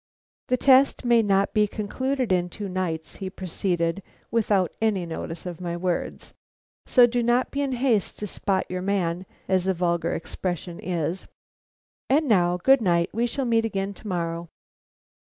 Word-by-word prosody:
"The 255 - +2
test 265 0 +4
may 240 -1 +5
not 200 -2 +2
be 210 -1 +3
concluded 255 +4 -2
in 180 -1 +2
two 205 +3 -6
nights," 170 -4 -3
he 190 -2 -4
proceeded, 180 -1 -2 0.3
without 205 -6 +2
any 205 -5 +1
notice 165 +1 -6
of 180 -1 -6
my 170 -1 -3
words. 180 0 -3 0.5
"So 250 -2 +7
do 240 0 0
not 240 +2 +2
be 280 - -2
in 275 -2 -1
haste 240 -5 +1
to 210 - -4
spot 195 -1 -1
your 185 0 -4
man, 185 -2 -1 0.2
as 185 -1 +1
the 190 -1 +1
vulgar 170 -1 0
expression 175 0 -4
is. 175 0 -3 0.8
And 295 +3 +3
now 180 -6 +3
good 265 +8 +4
night 170 -3 +2
we 235 +2 +1
shall 270 +3 -2
meet 230 -1 +2
again 200 -3 -2
to 210 - -12
morrow." 170 -2 -3
190 Hz, 165 wpm, -25 LUFS, 175-230 Hz, 0.8 s, So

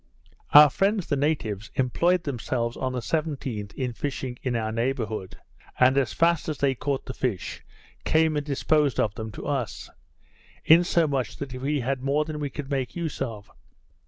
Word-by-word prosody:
Our 150 -1 +10
friends, 195 - +1
the 145 - 0
natives, 135 -9 -1
employed 170 +8 +2
themselves 120 -3 -2
on 130 - -2
the 125 -1 -3
17th 135 -9 -3
in 125 -3 -2
fishing 130 -1 -4
in 125 -2 -1
our 110 -1 -1
neighbourhood; 115 -5 -2 0.4
and, 130 +1 +5
as 135 -5 +2
fast 165 -1 +2
as 155 - -3
they 140 -1 +2
caught 140 +1 -3
the 130 - -5
fish, 120 -9 -3 0.4
came 160 -1 +3
and 145 - 0
disposed 145 -1 +1
of 105 - +1
them 110 0 -6
to - - -8
us; 125 - -3 0.7
insomuch 160 -6 +3
that 140 -3 -6
we 135 +3 -1
had 130 +1 -2
more 140 +3 +1
than 155 -1 -5
we 145 -1 -2
could 140 0 -7
make 135 -2 -2
use 170 -4 -4
of. 105 -4 -5
135 Hz, 170 wpm, -26 LUFS, 120-150 Hz, 0.7 s, Our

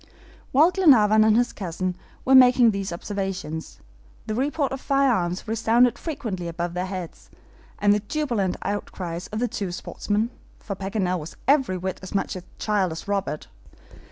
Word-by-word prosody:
While 310 +7 +5
Glenarvan 220 - +5
and 220 0 +4
his 245 0 +1
cousin 185 -1 -3 0.3
were 265 - +3
making 250 -2 +7
these 195 -2 -3
observations, 185 -3 -5 0.4
the 215 - -3
report 280 +4 0
of 270 0 -5
firearms 235 -10 +1
resounded 230 +2 +3
frequently 215 - -4
above 170 +1 -3
their 180 +1 -2
heads, 185 -3 -7 0.5
and 205 0 +4
the 210 - +2
jubilant 220 -5 -1
outcries 180 -3 -4
of 215 - -6
the 245 +2 +1
two 200 -6 -4
sportsmen 210 +5 -2 0.3
for 200 - -6
Paganel 190 -2 -1
was 155 +2 -9
every 265 -9 +3
whit 185 +1 -4
as 190 +2 -8
much 195 - -1
a 185 - -5 0.2
child 205 -5 0
as 160 - -7
Robert. 200 -6 -2
205 Hz, 155 wpm, -24 LUFS, 185-245 Hz, 0.5 s, making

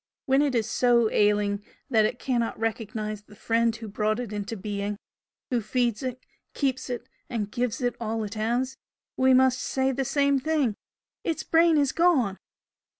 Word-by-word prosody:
When 270 +1 +4
it 285 -3 +1
is 225 -2 +1
so 235 -3 +3
ailing 205 -1 +2 0.3
that 220 -3 +5
it 235 - -1
cannot 240 -3 -1
recognise 215 -1 -3
the 210 0 -17
Friend 230 +1 +1
who 225 -1 -8
brought 215 +2 0
it 235 -4 -5
into 210 +2 -4
being, 205 +1 -3 0.5
who 245 -2 +1
feeds 235 0 0
it, 255 -1 -5 0.3
keeps 265 -2 -1
it, 245 0 -4 0.2
and 210 -4 -3
gives 240 0 -1
it 245 -1 0
all 225 -1 -2
it 205 0 -5
has, 240 +4 -1 0.4
we 260 0 +4
must 260 0 +4
say 265 0 0
the 270 +1 -1
same 280 +1 +2
thing 295 -5 +1 0.5
'Its 320 -2 -2
brain 330 -1 +4
is 280 -2 +3
gone!'" 275 - +3
235 Hz, 170 wpm, -26 LUFS, 215-260 Hz, 0.5 s, that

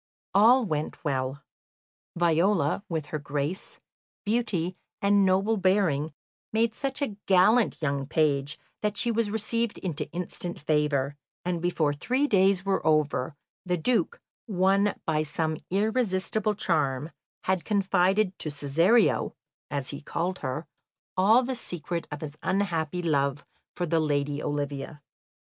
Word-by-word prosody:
All 235 +5 +6
went 155 -5 -3
well. 135 0 -2 0.7
Viola, 170 0 +2
with 160 -3 -2
her 155 - 0
grace, 145 +5 -3 0.5
beauty, 205 -6 0 0.2
and 200 0 +4
noble 195 +4 +2
bearing, 185 -6 +2 0.4
made 225 0 +2
such 275 +3 -2
a 220 -7 -3
gallant 205 +5 +4
young 140 -2 -1
page 145 -2 +1 0.2
that 210 -1 -1
she 235 +3 +1
was 230 -2 0
received 225 +1 -1
into 170 -6 -4
instant 175 0 -5
favour, 145 -2 0 0.3
and 175 -2 -1
before 165 -4 +1
three 255 - 0
days 195 -5 +3
were 195 -1 +1
over, 150 -2 +1 0.3
the 180 -1 0
Duke, 250 - 0 0.3
won 195 0 +2
by 155 -1 +1
some 155 +1 -1
irresistible 210 0 0
charm, 150 -6 0 0.3
had 185 -2 0
confided 195 -1 +2
to 155 - -2
"Cesario" 150 - +2 0.3
(as 140 -3 -3
he 140 - -7
called 180 +5 -2
her) 135 +4 -3 0.5
all 215 +7 +5
the 260 +2 -2
secret 175 -7 -4
of 150 -1 -6
his 150 -1 -7
unhappy 180 -3 -1
love 140 -3 0 0.3
for 175 - -1
the 165 0 +1
lady 145 -1 0
Olivia. 145 +1 -4
175 Hz, 130 wpm, -27 LUFS, 150-205 Hz, 0.7 s, All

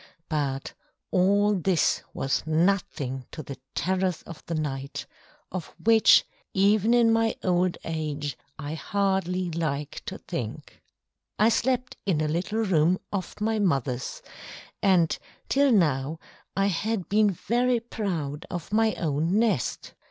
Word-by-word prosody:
But 140 -4 -2 0.4
all 200 +3 +4
this 185 -3 +2
was 135 - -1
nothing 155 -6 0
to 155 - -7
the 135 -2 -8 0.2
terrors 185 -2 0
of 170 - -10
the 170 - -2
night, 140 -3 -3 0.5
of 180 -3 -6
which, 225 0 +6 0.3
even 205 +3 +4
in 230 -2 +5
my 225 0 +2
old 180 -1 +2
age, 150 -3 -3 0.2
I 145 -1 -5
hardly 185 0 0
like 150 -3 -3
to - - -4
think. - - -6 0.6
I 215 +2 +5
slept 255 +2 0
in 170 -6 +2
a 155 - +1
little 185 +8 -1
room 175 -2 +3 0.2
off 195 0 -4
my 220 +1 0
mother's, 135 - -1 0.6
and 180 -5 +4 0.3
till 280 0 +4
now 155 - +2 0.4
I 195 - +3
had 200 +1 -1
been 210 +1 +4
very 240 +6 +1
proud 175 - -4
of 175 +2 -6
my 220 0 +3
own 160 +4 0
nest. 215 - 0
180 Hz, 130 wpm, -26 LUFS, 155-210 Hz, 0.6 s, which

